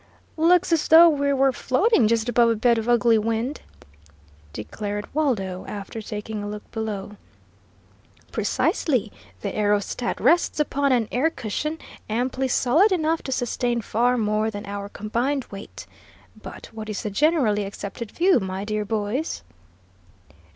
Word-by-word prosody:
"Looks 350 +3 +3
as 325 - +1
though 335 +2 +9
we 285 -2 +1
were 270 0 +3
floating 260 - +2
just 225 +1 +1
above 240 -1 +4
a 230 - +2
bed 235 +1 +3
of 225 +2 -4
ugly 235 -2 +4
wind!" 230 +6 -2 0.9
declared 205 - -5
Waldo, 205 -12 -1
after 205 +2 -6
taking 210 0 -5
a 205 - -5
look 210 0 -8
below. 210 -2 -5 1.1
"Precisely; 245 - 0 0.3
the 200 - -4
aerostat 210 +3 0
rests 345 -2 +2
upon 285 -1 +1
an 240 -4 +2
air 270 +6 +2
cushion 305 +4 -4 0.3
amply 255 +4 -1
solid 290 - +3
enough 325 -2 +1
to 265 - -6
sustain 245 -1 -1
far 240 +3 +1
more 215 0 0
than 205 -1 -7
our 200 0 -6
combined 240 +7 -2
weight. 195 0 -9 0.5
But - - -11
what 220 -1 -7
is 210 - -4
the 210 - -3
generally 250 - +2
accepted 200 +3 -6
view, 350 - +3
my 190 0 -4
dear 215 0 -2
boys?" 220 +8 -2
230 Hz, 145 wpm, -24 LUFS, 210-275 Hz, 1.1 s, though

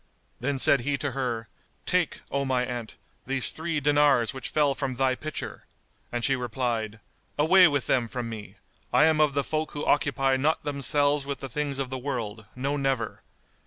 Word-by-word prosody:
Then 140 +2 -1
said 135 +1 +5
he 140 +3 -1
to 140 +1 -2
her, 120 -4 -2 0.4
"Take, - - 0
O 140 0 0
my 130 -2 +1
aunt, 120 -3 -5 0.3
these 135 -1 +1
three 160 -1 -2
dinars 145 -5 +3
which 130 -3 -5
fell 145 -2 +2
from 135 -2 -3
thy 130 0 +2
pitcher;" 155 +4 -6 0.5
and 120 -1 0
she 135 - +3
replied, 120 -3 -2 0.4
"Away 180 +5 +7
with 145 -4 0
them 120 -3 +2
from 120 0 -4
me! 110 -2 -8 0.4
I - - +5
am 155 -1 +3
of 150 -2 +3
the 140 - +2
folk 155 +1 -2
who 145 - -4
occupy 135 -2 +2
not 150 +4 +1
themselves 145 0 +1
with 140 -1 -3
the 135 - -6
things 145 +2 -2
of 135 -2 -3
the 130 - -3
world, 115 -6 -4
no 140 +3 -1
never! 135 -5 -1
135 Hz, 185 wpm, -27 LUFS, 125-145 Hz, 0.5 s, Away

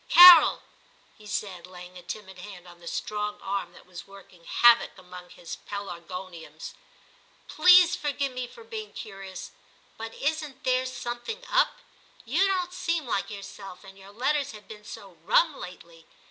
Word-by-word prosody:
'Carol/ 350 -3 +10 0.5
he 210 - -15
said, 185 -3 -4
laying 180 0 -12
a 180 - -10
timid 190 +1 -8
hand 180 -2 -11
on 175 -1 -15
the 170 - -13
strong 210 +2 -3
arm 195 0 -3
that - - -16
was 180 0 -11
working 195 -3 -16
havoc 240 -3 +4
among 180 -1 -12
his 170 - -9
pelargoniums, 175 -4 -8 0.4
' - - -32
please 360 -1 +7
forgive 280 -2 -2
me 250 -1 -5
for 460 - -14
being 445 -2 -7
curious, 195 -4 -8 0.5
but 225 0 -7
isn't 300 -2 -3
there 255 0 +1
something 255 - -6
up - - +3
"i - - -23 0.4
You 330 +12 +2
don't 365 -2 -1
seem 335 -4 -1
like 200 -4 -2
yourself; 195 -2 -10
and 195 -1 -13
your 195 0 -15
letters 275 +4 -1
have 210 -1 -13
been 210 -1 -11
so 195 -5 -11
rum 315 - +3
lately. 170 -2 -11
210 Hz, 160 wpm, -27 LUFS, 180-280 Hz, 0.5 s, Carol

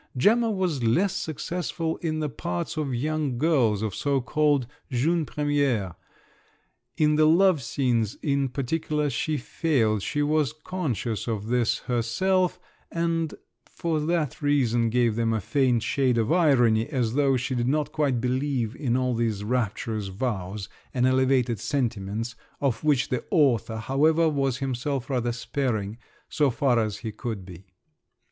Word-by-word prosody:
Gemma 225 - +4
was 185 - -1
less 165 - +2
successful 160 +1 -3
in 155 -2 -2
the 150 - 0
parts 90 - -4
of 150 -4 -2
young 150 0 -1
girls—of 115 -9 +2
so 140 -2 0
called 145 +1 +1 0.2
"jeunes 155 +5 +1
premières"; 140 - 0 1.0
in 150 -1 +3
the 155 0 +5
love 175 -1 +4
scenes 120 -3 0
in 140 -2 +1
particular 150 +3 -1
she 155 +4 -1
failed; 120 - 0
she 145 +8 -1
was 150 -2 +1
conscious 150 - -3
of 110 -1 -3
this 120 -2 +2
herself, 175 +11 0 0.3
and 165 -1 -1 0.3
for 165 -2 -2
that 155 -3 -1
reason 120 -6 +2
gave 120 -1 +2
them 115 0 +1
a 110 - 0
faint 125 +1 +1
shade 130 0 +1
of 115 -1 +1
irony 125 -10 +4
as 125 -7 -1
though 135 -1 +3
she 125 +2 -2
did 120 -1 0
not 150 +2 0
quite 140 -5 +1
believe 125 -1 -1
in 125 -5 0
all 125 -1 0
these 115 -3 -1
rapturous 110 -2 -2
vows 95 -2 -3 0.3
and 125 0 +2
elevated 130 -3 +2
sentiments, 115 -3 -2 0.2
of 130 -4 -1
which 145 -4 +2
the 125 - -1
author, 130 - +2
however, 155 +8 +2
was 135 -4 0
himself 135 0 -3
rather 120 -2 0
sparing—so 120 +3 -2
far 125 -1 +2
as 110 -2 -1
he 110 - -5
could 105 -3 -5
be. 90 +1 -12
130 Hz, 145 wpm, -26 LUFS, 115-150 Hz, 1.0 s, the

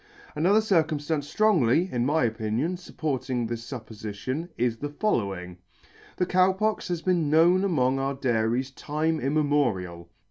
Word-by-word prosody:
Another 190 +8 +3
circumffance 155 -6 0
ftrongly, 180 - +3
in 120 0 0
my 150 -1 +2
opinion, 115 +8 -1
fupporting 130 -8 -3
this 115 0 -6
fuppofition,. 115 - -5
is 120 -1 0
the 145 +5 -4
following: 100 - -2 0.6
The 180 - +1
Cow 185 +1 +3
Pox 215 +3 -1
has 175 -3 -3
been 175 -5 +1
known 170 +5 +4
among 135 -8 +1
our 135 +1 -1
dairies 125 0 0
time 155 +3 -2
immemorial. 125 - 0
145 Hz, 135 wpm, -26 LUFS, 120-170 Hz, 0.6 s, known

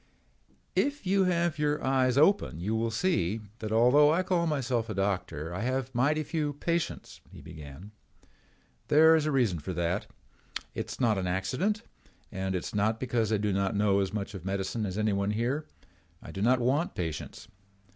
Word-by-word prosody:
"If 285 -4 0
you 190 +1 +3
have 170 -3 0
your 150 0 0
eyes 130 -1 +2
open 155 - +3
you 100 +6 -2
will 115 +1 0
see 115 - 0 0.2
that 110 -1 -5
although 125 +7 +5
I 175 +4 +2
call 175 -2 +1
myself 125 -6 -1
a 110 - -3
doctor 90 -5 -2
I 90 - -4
have 130 +1 -2
mighty 145 +6 +2
few 150 -1 -2
patients," 170 +3 -3
he - - -12
began. 75 +6 -11 1.0
"There 160 +2 +6
is 155 -1 +1
a - - +1
reason 120 - +1
for 90 +5 -5
that. 85 0 -1 0.7
It - - -4
is - - -8
not 110 -6 +2
an 90 - -2
accident 130 - -1 0.5
and 95 0 -2
it 90 - -2
is - - -6
not 110 +2 +1
because 115 -4 0
I 110 - +3
do 105 -1 0
not 95 +1 0
know 100 -1 +3
as 95 -1 0
much 105 -1 -4
of 95 -4 -8
medicine 95 +3 -2
as 95 +1 -5
anyone 100 -2 +1
here. 120 +8 -1 0.5
I - - -10
do 95 - -5
not 125 +4 +4
want 135 +7 0
patients. 80 -4 -5
115 Hz, 185 wpm, -29 LUFS, 100-150 Hz, 1.0 s, There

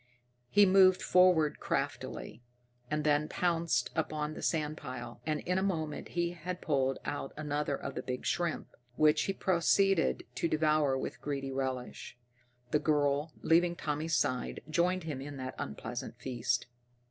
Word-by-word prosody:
He 205 0 +6
moved 185 -1 +6
forward 180 -6 +4
craftily, - - -3 0.5
and 150 0 -1
then 150 0 +2
pounced 165 -8 0
upon 155 -1 -1
the - - -8
sand 155 -2 0
pile, 125 -3 -7
and 155 -1 0
in 180 +1 0
a - - -1
moment 160 -6 -2
had 175 +1 -3
pulled 135 -3 +1
out 145 -2 -4
another 150 -1 -1
of 135 - -6
the - - -4
big 125 0 -5
shrimps, 175 -3 -1 0.2
which 150 +2 +4
he 195 - -1
proceeded 190 0 +2
to - - 0
devour 155 -3 +2
with - - -5
greedy 135 -2 -3
relish. 130 -2 -4 0.5
The 150 - +3
girl, 145 0 +1
leaving 170 +1 +4
Tommy's 155 +1 -1
side, 125 -3 -1
joined 180 +3 +1
him 150 -5 -4
in 145 0 -7
that 130 0 -5
unpleasant 115 - -5
feast. 120 -2 -1
150 Hz, 145 wpm, -32 LUFS, 135-170 Hz, 0.5 s, He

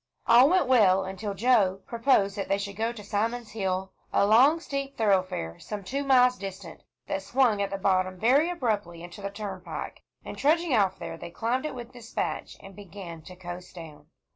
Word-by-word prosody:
All 245 +4 +7
went 365 -3 +3
well, 200 -7 +4
until 195 +2 -5
Joe 200 -5 +3
proposed 230 -5 +2
that 195 - -4
they 195 - +1
should 200 0 -5
go 225 +3 -1
to 225 -3 -10
Simon's 225 +3 -2
Hill, 190 -2 -2 0.2
a - - +3
long 260 +10 +5
steep 275 -3 -5
thoroughfare 185 - 0
some 210 -2 -6
two 275 +9 -3
miles 250 -2 +4
distant, 195 -2 -8 0.2
that 195 - -3
swung 235 -1 +2
at 200 - -1
the 195 - -3
bottom 185 -1 0
very 275 - +4
abruptly 210 - -2
into 175 +3 -10
the 200 - -3
turnpike. 200 -2 -7 0.2
And - - -6
trudging 320 +1 +2
off 195 -3 +2
there, - - -7
they - - -7
climbed 240 - -1
it 280 - -7
with 245 0 -9
despatch, 235 -2 -4
and 195 -1 -12
began 185 -4 -9
to 180 +4 -12
coast 180 0 -9
down. 155 -3 -11
205 Hz, 190 wpm, -27 LUFS, 190-245 Hz, 0.2 s, All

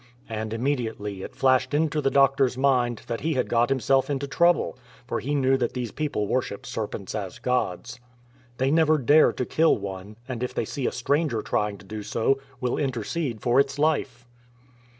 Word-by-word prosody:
And 110 -1 -4
immediately 115 -5 -2
it - - -8
flashed 130 +1 +2
into 150 0 +1
the 135 - +2
doctor's 135 -2 +3
mind 125 -4 +1
that 115 - -4
he 160 +1 0
had 125 - 0
got 120 +1 +2
himself 135 0 +2
into 140 -1 -1
trouble, 170 +3 +2 0.3
for - - -2
he 145 +3 -2
knew 135 -1 +3
that 120 -3 -1
these 125 -4 -4
people 145 -9 -2
worship 105 -2 -2
serpents 105 -3 -5
as 100 0 -5
gods. 120 -1 -2 0.6
They 130 +1 +1
never 155 0 +4
dare 150 +3 +5
to 125 - -2
kill 160 +5 +3
one, 100 0 -7
and 125 -3 -5
if 125 - -3
they - - 0
see 140 -4 -3
a - - 0
stranger 140 -2 0
trying 105 -1 -1
to 100 - -16
do 105 +2 -6
so, 115 +6 0 0.2
will 125 -1 -1
inter 130 -6 -1
cede 130 -7 -3
for 125 +2 +3
its 140 0 +1
life. 140 -5 0
125 Hz, 190 wpm, -25 LUFS, 115-140 Hz, 0.6 s, dare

